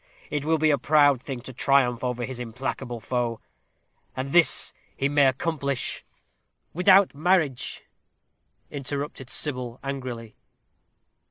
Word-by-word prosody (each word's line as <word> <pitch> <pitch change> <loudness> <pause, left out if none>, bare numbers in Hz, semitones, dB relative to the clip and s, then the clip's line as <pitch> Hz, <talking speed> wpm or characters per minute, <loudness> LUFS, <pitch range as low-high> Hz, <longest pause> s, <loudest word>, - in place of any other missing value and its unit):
It 150 -1 -2
will 160 +1 +2
be 155 0 +3
a 140 - +1
proud 145 -2 +4
thing 130 -2 -6
to 130 - -9
triumph 125 -2 +2
over 125 -1 -2
his 130 -1 -7
implacable 125 +1 -5
foe; 120 -1 -2 0.8
and 130 +1 -4
this 170 0 +5 0.2
he 135 - +1
may 145 -1 +4
accomplish 140 -1 -2 0.3
" - - -48
"Without 185 +2 +5
marriage," 155 -4 0 0.9
interrupted 140 -1 -5
Sybil, 125 -5 -1
angrily. 125 -5 -6
135 Hz, 120 wpm, -25 LUFS, 125-150 Hz, 0.9 s, this